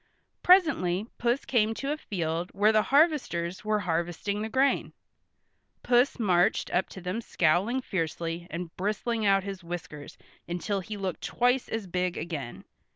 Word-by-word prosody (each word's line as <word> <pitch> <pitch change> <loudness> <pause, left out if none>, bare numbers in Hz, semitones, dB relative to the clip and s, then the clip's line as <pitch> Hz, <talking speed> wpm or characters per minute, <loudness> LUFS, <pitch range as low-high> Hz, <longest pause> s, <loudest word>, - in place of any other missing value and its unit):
Presently 265 - +4
Puss 240 +3 0
came 225 -3 +2
to 275 +5 -3
a 300 - -1
field 170 - -3
where 210 +2 +4
the 215 -1 +4
harvesters 260 - +1
were 215 -1 +1
harvesting 175 +3 -2
the 220 - -3
grain. 265 +3 +1 0.9
Puss 245 +2 +3
marched 180 -7 +2
up 180 - +1
to 190 - -9
them 180 +6 -3
scowling 190 +8 +1
fiercely 170 -3 -3
and 170 0 -6
bristling 215 +3 -1
out 195 -1 +4
his 195 -2 -6
whiskers 170 -4 -7 0.3
until 180 +4 -2
he 210 +3 -6
looked 190 -2 -4
twice 245 +1 +1
as 225 -2 -3
big 180 0 -2
again. 150 -7 -5
195 Hz, 150 wpm, -28 LUFS, 175-230 Hz, 0.9 s, Presently